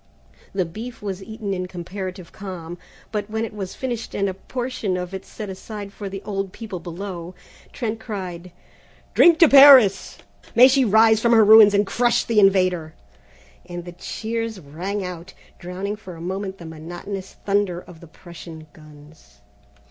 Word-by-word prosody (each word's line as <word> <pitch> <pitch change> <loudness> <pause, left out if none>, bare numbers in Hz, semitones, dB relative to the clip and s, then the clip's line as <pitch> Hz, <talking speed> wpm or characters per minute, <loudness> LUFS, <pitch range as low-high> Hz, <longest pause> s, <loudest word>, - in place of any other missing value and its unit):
The 190 -2 -1
beef 225 +7 -9
was 195 -2 -4
eaten 220 -1 -5
in 185 -1 -3
comparative 185 0 -7
calm, 175 -3 -8 0.3
but 210 -1 -3
when 220 +1 -2
it 225 - -9
was 195 -3 -6
finished 245 -3 -5
and 200 - 0
a 190 - -2
portion 230 -2 -4
of 180 +1 -5
it 190 - -7
set 215 - -7
aside 200 +1 -8
for 205 -1 -6
the 195 0 -7
old 195 -2 -3
people 210 -5 -7
below, 175 0 -7 0.4
Trent 225 -3 -4
cried: 185 -5 -7 0.6
"Drink 340 -2 +6
to 330 - +7
Paris! 270 -8 +7 0.4
May 250 +2 +9
she 270 0 +3
rise 220 0 +5
from 235 +1 +3
her 220 -2 +6
ruins 215 -1 +8
and 205 +1 +3
crush 240 +4 +1
the 225 -2 +2
invader!" 185 -5 +2 0.7
and 175 -1 -8
the 175 - -8
cheers 225 +4 -5
rang 180 +6 -5
out, 180 0 -8 0.2
drowning 190 +3 -5
for 190 -5 -11
a - - -12
moment 190 +3 -4
the 170 - -11
monotonous 175 +5 -8
thunder 200 -3 0
of 180 -2 -14
the 170 - -14
Prussian 165 -1 -12
guns. 150 -7 -18
195 Hz, 165 wpm, -22 LUFS, 175-220 Hz, 0.7 s, May